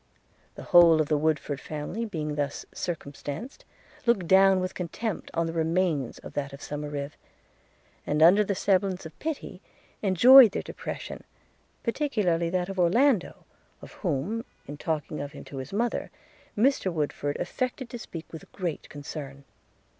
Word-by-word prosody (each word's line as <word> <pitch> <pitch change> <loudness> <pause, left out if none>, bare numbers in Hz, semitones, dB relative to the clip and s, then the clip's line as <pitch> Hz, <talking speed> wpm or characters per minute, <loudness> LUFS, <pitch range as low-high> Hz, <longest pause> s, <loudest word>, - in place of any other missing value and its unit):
The - - -9
whole 170 -2 +7
of 155 - +1
the 150 - +3
Woodford 150 -2 0
family, 155 +9 -4
being 155 -8 -3
thus 145 -1 -3
circumstanced, 175 - -6 0.4
looked 205 -7 +3
down 190 +1 +6
with 185 0 -3
contempt 190 +4 -4
on 165 0 +1
the 165 - -4
remains 165 -5 0
of - - -11
that 140 -1 -3
of 140 - -9
Somerive; 145 -1 -5 1.0
and, 150 +1 +3
under 190 +6 +7
the 200 -1 -1
semblance 190 -2 +1
of 160 - -11
pity, 315 -2 -5 0.4
enjoyed 230 +4 +8
their - - -2
depression, - - -7 0.6
particularly 210 - 0
that 180 0 -1
of 195 -1 -5
Orlando, 220 +4 +2 0.3
of - - -12
whom, 185 +7 -2 0.2
in 145 - -7
talking 155 -1 -3
of 145 0 -6
him - - -9
to 140 - -9
his 130 +1 -6
mother, 230 +4 -1 0.5
Mr 230 -4 +2
Woodford 145 -2 -2
affected 255 0 -3
to 240 - -6
speak 165 -7 -8
with 160 - -10
great 175 -5 -4
concern. 140 -1 -8
170 Hz, 150 wpm, -27 LUFS, 150-205 Hz, 1.0 s, enjoyed